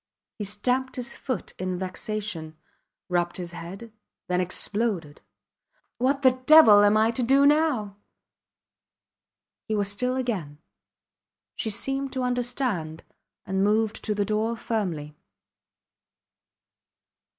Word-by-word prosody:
He 205 - -3
stamped 250 +6 -1
his 250 0 -5
foot 255 - -4
in 185 -1 -2
vexation, 185 -3 -4 0.5
rubbed 175 -1 0
his 175 -2 -6
head 195 +7 -9 0.3
then 180 0 0
exploded. 185 -4 -2 0.8
What 275 +3 +1
the 255 0 +4
devil 300 -10 +9
am 205 +1 +5
I 220 +1 +3
to 235 - -3
do 270 +4 +4
now? 285 -10 +2 1.7
He 220 - -1
was 200 -1 +1
still 250 +5 -1
again. 200 - -3 1.0
She 225 - -2
seemed 270 +5 -2
to 260 -1 -2
understand, 245 - -2 0.4
and 190 0 0
moved 215 +1 +1
to 210 - -1
the 205 0 0
door 220 +3 -1
firmly. 170 -11 -3
215 Hz, 115 wpm, -26 LUFS, 185-250 Hz, 1.7 s, devil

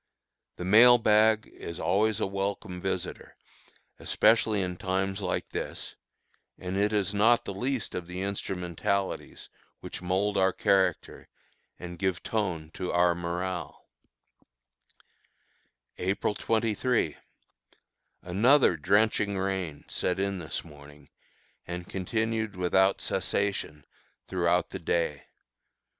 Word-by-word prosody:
The 90 - -6
mail 120 +6 +8
bag 110 -1 +4
is 85 - -7
always 105 +1 +1
a - - +1
welcome 100 -1 -3
visitor, 95 -1 -4 0.6
especially 110 -3 +3
in 90 -1 -4
times 95 +2 -1
like 90 - -2
this, - - -5 0.6
and 90 +1 -5
it 100 +2 +2
is 105 -2 0
not 115 +4 +4
the 100 - -4
least 125 +3 -2
of 90 -2 -5
the 90 +1 -5
instrumentalities 95 0 -3 0.3
which - - -8
mould 95 +3 0
our 95 -1 +3
character 95 -4 +1 0.5
and 90 -1 -8
give 95 -3 -1
tone 90 -8 -2
to 90 - -3
our 90 0 +4
morale. 85 +1 -4 2.1
April 95 +3 0
23. 115 - 0 1.1
Another 105 - +4
drenching 100 +3 +2
rain 95 -6 -3
set 90 - -1
in 100 0 -1
this 80 -2 -5
morning 75 -2 -15 0.6
and 90 0 -5
continued 110 +2 -2
without 95 +2 +2
cessation 95 -7 -2 0.4
throughout 90 -1 +1
the - - -5
day. 80 -3 -1
95 Hz, 110 wpm, -28 LUFS, 90-105 Hz, 2.1 s, mail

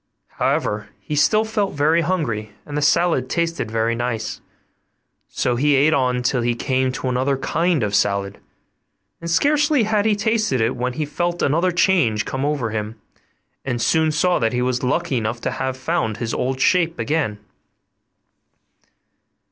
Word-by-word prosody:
However, 105 0 0
he 150 - -5
still 215 +9 +3
felt 210 -3 -1
very 155 +4 +2
hungry, 120 - -2
and 145 - -7
the 150 - 0
salad 165 -4 +2
tasted 165 -7 -1
very 115 +1 0
nice; 115 -2 -3 0.9
so 125 - -1
he 145 +3 +3
ate 145 +4 +4
on 125 -3 +1
till 125 0 +1
he 120 0 0
came 130 +1 0
to 130 - -4
another 130 +2 0
kind 165 0 0
of 105 -1 -2
salad, 100 -1 0 0.8
and 170 - -6
scarcely 290 - +3
had 210 -1 +1
he 215 - +3
tasted 215 - 0
it 115 +3 +1
when 125 0 -2
he 155 +3 -2
felt 175 +4 -2
another 170 +6 +2
change 170 - +2
come 130 +1 -3
over 140 -6 -1
him, 110 +1 -4 0.6
and 125 -3 -2
soon 160 +5 +2
saw 175 +4 +2
that 115 0 0
he 125 - 0
was 125 -1 -1
lucky 130 0 0
enough 110 +1 -2
to - - -2
have 130 -1 -3
found 130 -6 -1
his 115 +1 -3
old 130 +1 -2
shape 170 -1 +2
again. 145 -9 -1
135 Hz, 165 wpm, -21 LUFS, 120-170 Hz, 0.9 s, ate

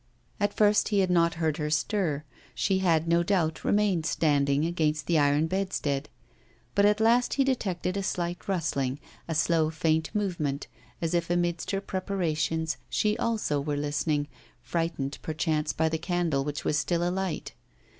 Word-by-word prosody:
At 205 -1 0
first 210 -1 +4
he 210 - +1
had 190 -2 +3
not 170 -1 +3
heard 160 -2 0
her 150 -1 -2
stir; 155 -1 0 0.3
she 190 -1 +1
had 165 -3 +2
no 170 +1 +4
doubt 170 -3 0
remained 200 -6 +2
standing 145 -2 +2
against 155 -3 0
the 170 -2 +2
iron 145 +1 +3
bedstead. 160 -6 -2 0.6
But 200 0 +4
at 210 +1 +2
last 235 +3 +3
he 275 - +3
detected 195 -9 -1
a 200 - -1
slight 175 -2 -3
rustling, 145 -8 -1 0.3
a 165 - -2
slow, 160 0 +2
faint 160 0 0
movement, 160 -9 -1 0.4
as 165 - 0
if 170 -1 0
amidst 175 -1 0
her 195 -1 -1
preparations 165 -5 -1
she 210 0 +1
also 215 -11 0
were 145 0 -2
listening, 145 0 0 0.4
frightened 165 -5 -2
perchance 155 -1 -1
by 160 - +1
the 160 0 -1
candle 170 -5 0
which 145 +1 -4
was 150 - +2
still 175 +2 0
alight. 185 -2 -3
165 Hz, 160 wpm, -28 LUFS, 150-190 Hz, 0.6 s, first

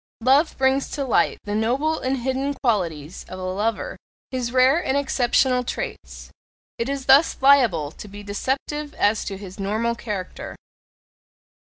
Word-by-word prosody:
Love 275 +6 +3
brings 265 +1 +2
to 280 -2 -3
light 255 - +2
the 205 - -4
noble 260 +9 0
and 260 +1 -1
hidden 270 +2 -1
qualities 175 - -2
of 185 - -7
a 185 - -7
lover 205 +4 -2 0.3
his 250 -2 -2
rare 260 +7 +4
and 265 - 0
exceptional 255 -2 +2
traits: - - -6 0.5
it 230 +3 -1
is 275 -1 -3
thus 275 +4 +5
liable 240 - +4
to 210 - -11
be 205 +1 -10
deceptive 275 +8 -3
as 210 +1 +2
to 195 - -5
his 190 0 -10
normal 215 +4 0
character. 210 -6 -6
245 Hz, 150 wpm, -23 LUFS, 205-270 Hz, 0.5 s, thus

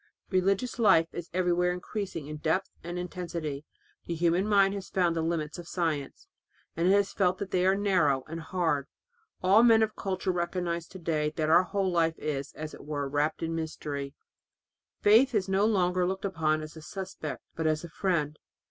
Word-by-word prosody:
Religious 195 +6 +1
life 195 -7 +5
is 175 0 -6
everywhere 180 0 +2
increasing 180 -2 -4
in 150 +1 -6
depth 160 +5 0
and 175 +1 -5
in 180 - -2
intensity.... 170 -5 -5 0.4
The 170 - -2
human 175 +4 +2
mind 200 -2 +4
has 200 -2 -6
found 175 -3 +1
the 165 - 0
limits 160 -1 -2
of 170 - -9
science, 160 -7 -2 0.5
and 170 +2 +1
has 200 0 +3
felt 185 -2 +2
that 200 0 -5
they 185 0 +2
are 190 - +4
narrow 175 -10 +2
and 165 +1 -5
hard; 160 -5 -1 0.6
all 195 +4 +6
men 225 -2 +6
of 215 -1 -2
culture 190 -1 -2
recognize 175 -1 -2
to 190 - -11
day 155 -3 0
that 155 -1 0
our 170 - +7
whole 195 0 -1
life 165 -2 +1
is, 140 -3 -3
as 155 0 -7
it - - -11
were, 145 -1 -3
wrapped 145 +4 -1
in 165 0 -2
mystery. 150 -3 -4 0.9
Faith 230 +5 +5
is 195 -3 +1
no 195 +2 +3
longer 180 -4 +2
looked 190 +1 -3
upon 155 -4 0
as 155 +1 -9
a 160 - -9
suspect 185 -3 -6
but 160 -1 -1
as 155 +1 0
a 170 - -7
friend. 155 -4 -1
175 Hz, 190 wpm, -29 LUFS, 155-190 Hz, 0.9 s, our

